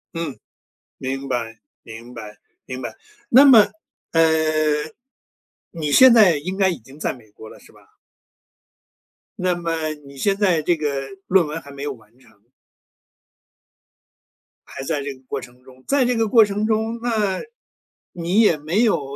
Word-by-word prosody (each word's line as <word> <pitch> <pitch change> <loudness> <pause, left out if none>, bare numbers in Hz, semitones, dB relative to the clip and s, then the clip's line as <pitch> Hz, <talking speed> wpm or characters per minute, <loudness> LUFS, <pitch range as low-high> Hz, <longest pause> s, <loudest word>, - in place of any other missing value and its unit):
嗯， 165 -5 -4 0.6
明 135 +1 -4
白， 115 -3 -4 0.2
明 115 +2 -11
白， 105 -3 -10 0.3
明 130 0 -7
白。 120 - -6 0.3
那 260 +4 +7
么， 225 -7 +7 0.4
呃， 165 - +3 1.5
你 155 -4 -4
现 255 - +8
在 200 -9 +6
应 185 +6 -5
该 190 -1 +2
已 175 - -3
经 130 +5 -17
在 - - -1
美 110 -5 -15
国 110 +1 -13
了 - - -14
是 - - -19
吧？ - - -24 1.4
那 180 -1 0
么 170 -1 -4 0.3
你 140 - -13
现 195 +9 0
在 180 -6 +2
这 175 +3 +1
个 140 -3 -3 0.2
论 185 -2 +4
文 155 +2 -5
还 140 - -13
没 140 0 -10
有 145 -1 -3
完 115 0 -21
成。 110 -5 -25 2.2
还 135 - -8
在 145 +1 -2
这 140 0 -5
个 130 - -19
过 - - -4
程 125 +1 -15
中。 130 0 -18
在 275 -3 +2
这 250 - 0
个 225 -1 +1
过 225 +1 +6
程 205 +1 -2
中， 220 +1 -1
那 215 -5 -1 0.7
你 175 +5 +1
也 205 -8 +4
没 160 +10 0
有 220 -9 +2
160 Hz, 170 characters per minute, -21 LUFS, 130-205 Hz, 2.2 s, 现